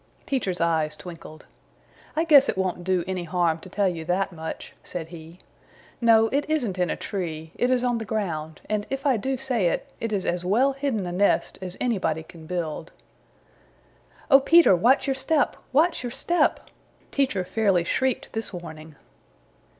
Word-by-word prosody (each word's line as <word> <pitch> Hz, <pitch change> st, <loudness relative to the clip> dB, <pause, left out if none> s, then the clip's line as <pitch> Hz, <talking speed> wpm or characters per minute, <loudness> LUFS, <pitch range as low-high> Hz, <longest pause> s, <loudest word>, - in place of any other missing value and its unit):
Teacher's 200 Hz, -10 st, -1 dB
eyes 160 Hz, -2 st, +1 dB
twinkled. 165 Hz, -2 st, -11 dB, 0.7 s
"I 320 Hz, -, +2 dB
guess 290 Hz, -5 st, +6 dB
it -, -, -1 dB
won't 185 Hz, -2 st, -1 dB
do 185 Hz, -1 st, +1 dB
any 185 Hz, -2 st, -3 dB
harm 170 Hz, -1 st, +1 dB
to 185 Hz, -, -12 dB
tell 200 Hz, +1 st, +1 dB
you 170 Hz, -3 st, -3 dB
that 185 Hz, +4 st, 0 dB
much," 160 Hz, -2 st, -7 dB
said 165 Hz, -3 st, -6 dB
he. 165 Hz, 0 st, -11 dB, 0.6 s
"No, 225 Hz, -1 st, +6 dB
it 285 Hz, +2 st, +1 dB
isn't 240 Hz, -12 st, -1 dB
in 180 Hz, -2 st, +1 dB
a -, -, 0 dB
tree. 160 Hz, -5 st, -5 dB
It 245 Hz, -, 0 dB
is 255 Hz, -1 st, +2 dB
on 245 Hz, -2 st, +1 dB
the -, -, -4 dB
ground 160 Hz, -8 st, -3 dB
and, 210 Hz, -1 st, -2 dB
if 270 Hz, +1 st, -4 dB
I 265 Hz, -4 st, +3 dB
do 265 Hz, +5 st, -2 dB
say 250 Hz, -7 st, 0 dB
it, -, -, -1 dB
it 230 Hz, -, -3 dB
is 200 Hz, -3 st, -1 dB
as 175 Hz, 0 st, -1 dB
well 240 Hz, +9 st, +3 dB
hidden 270 Hz, -8 st, -2 dB
a 175 Hz, -, -4 dB
nest 200 Hz, +3 st, +1 dB
as 185 Hz, -1 st, -6 dB
anybody 175 Hz, -10 st, 0 dB
can 160 Hz, 0 st, -14 dB
build. 165 Hz, -2 st, -4 dB, 1.4 s
Oh, 270 Hz, -, +9 dB
Peter, 330 Hz, -, +6 dB
watch 240 Hz, +10 st, +3 dB
your 275 Hz, -, +1 dB
step! 290 Hz, +3 st, +1 dB, 0.2 s
Watch 320 Hz, +6 st, +3 dB
your 245 Hz, -1 st, -4 dB
step!" 345 Hz, +7 st, 0 dB, 0.4 s
Teacher 260 Hz, -9 st, +1 dB
fairly 195 Hz, -3 st, +1 dB
shrieked 260 Hz, +8 st, -1 dB
this 225 Hz, 0 st, -3 dB
warning. 160 Hz, -4 st, -9 dB
190 Hz, 175 wpm, -25 LUFS, 170-255 Hz, 1.4 s, Oh